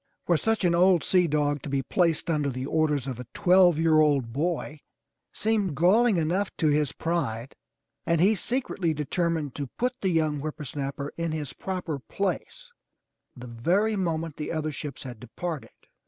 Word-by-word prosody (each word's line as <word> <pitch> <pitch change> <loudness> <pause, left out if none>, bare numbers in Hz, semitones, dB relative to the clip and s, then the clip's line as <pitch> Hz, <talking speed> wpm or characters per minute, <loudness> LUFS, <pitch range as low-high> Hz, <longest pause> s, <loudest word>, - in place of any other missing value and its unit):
For 175 - +3
such 225 +4 +1
an 170 - +3
old 180 0 +4
sea 180 -2 +3
dog 145 -2 0
to 145 - -6
be 135 -1 0
placed 165 +3 +1
under 150 -4 +1
the 130 0 -4
orders 150 -3 +1
of 130 -3 -5
a 125 - -7
twelve 180 -2 +5
year 160 -1 +4
old 140 -6 +2
boy 155 +1 -2 0.5
seemed 210 -7 0
galling 200 - +4
enough 175 +5 0
to 155 - +2
his 150 -2 +2
pride 135 -8 -2 0.5
and 170 -1 +1
he 195 +6 +5
secretly 200 -7 -1
determined 155 -1 -1
to 140 -2 -4
put 250 +1 0
the 190 - +1
young 155 -4 +1
whippersnapper 140 -1 -5
in 165 -1 -1
his 150 -4 -4
proper 180 -6 -4
place 200 - -4 0.7
the 125 - -9
very 175 - +1
moment 165 -5 -2
the 150 - -4
other 155 -1 -2
ships 145 -2 -6
had 125 -4 -8
departed. 150 +6 -5
160 Hz, 170 wpm, -27 LUFS, 145-180 Hz, 0.7 s, twelve